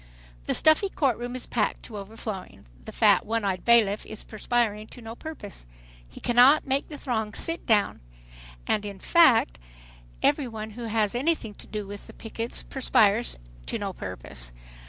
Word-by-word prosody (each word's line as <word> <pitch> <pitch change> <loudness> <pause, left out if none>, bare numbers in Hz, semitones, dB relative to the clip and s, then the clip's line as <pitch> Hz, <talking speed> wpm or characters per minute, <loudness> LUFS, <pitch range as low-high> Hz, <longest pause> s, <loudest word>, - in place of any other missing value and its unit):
The - - 0
stuffy 315 +6 +4
court 270 - +1
room 245 +1 -4
is 255 - -4
packed 220 -3 -1
to 215 - -8
overflowing. 200 -1 -7 0.2
The - - -7
fat, - - +4
one 225 0 -1
eyed 185 -2 -1
bailiff 220 -3 +4
is 215 - -7
perspiring 215 -1 -1
to 250 - -12
no 225 -1 -8
purpose. 230 - -8 0.4
He - - -12
cannot 250 +5 +5
make 275 +1 0
the 300 - -7
throng 220 -6 -2
"sit 330 +1 -2
down." 210 -4 +3 0.7
In 205 -2 -1
fact 260 - +4 0.6
every 280 - +3
one 220 -2 -6
who 235 +2 -7
has 220 -2 +1
anything 250 -4 0
to - - -14
do 210 -1 -4
with 200 +1 -9
the - - -12
pickets 225 +1 -5
perspires 230 -4 +2 0.3
to - - -2
no - - -4
purpose. - - -7
225 Hz, 165 wpm, -26 LUFS, 210-245 Hz, 0.7 s, cannot